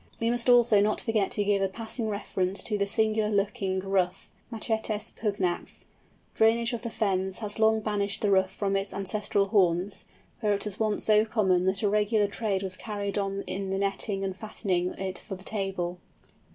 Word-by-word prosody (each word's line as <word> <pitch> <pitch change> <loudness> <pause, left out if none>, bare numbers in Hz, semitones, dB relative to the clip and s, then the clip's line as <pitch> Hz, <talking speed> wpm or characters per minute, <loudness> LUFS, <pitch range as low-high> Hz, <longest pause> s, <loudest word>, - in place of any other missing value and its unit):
We 230 +1 +1
must 240 +1 0
also 240 -4 +6
not 210 +1 +1
forget 215 -4 0
to 205 - -1
give 200 -1 +2
a 195 - +3
passing 220 +3 -4
reference 195 -2 -2
to 215 - -1
the 200 -1 0
singular 220 0 +1
looking 200 -2 0
Ruff 185 -2 -1 0.2
(Machetes 220 -2 -2
pugnax). 200 -5 -2 0.5
Drainage 230 +2 +3
of 235 - -3
the 235 - -4
fens 190 -4 -1
has 210 -1 -5
long 220 0 +4
banished 205 -1 -1
the 205 - +2
Ruff 190 -1 +4
from 195 +1 -1
its 195 0 -2
ancestral 200 0 0
haunts, 190 -1 +2 0.4
where 210 -3 +2
it 200 - -2
was 210 -1 -4
once 215 -2 0
so 215 0 +5
common 190 -5 +2
that 190 +3 0
a - - +4
regular 210 +1 +2
trade 200 -2 -1
was 185 -1 -4
carried 205 -1 -3
on 195 0 -2
in 195 0 -3
netting 195 0 -1
and 190 -1 -2
fattening 190 -4 -2
it 190 -1 -4
for 195 - -7
the 185 - -12
table. 190 -4 -3
205 Hz, 185 wpm, -28 LUFS, 195-220 Hz, 0.5 s, also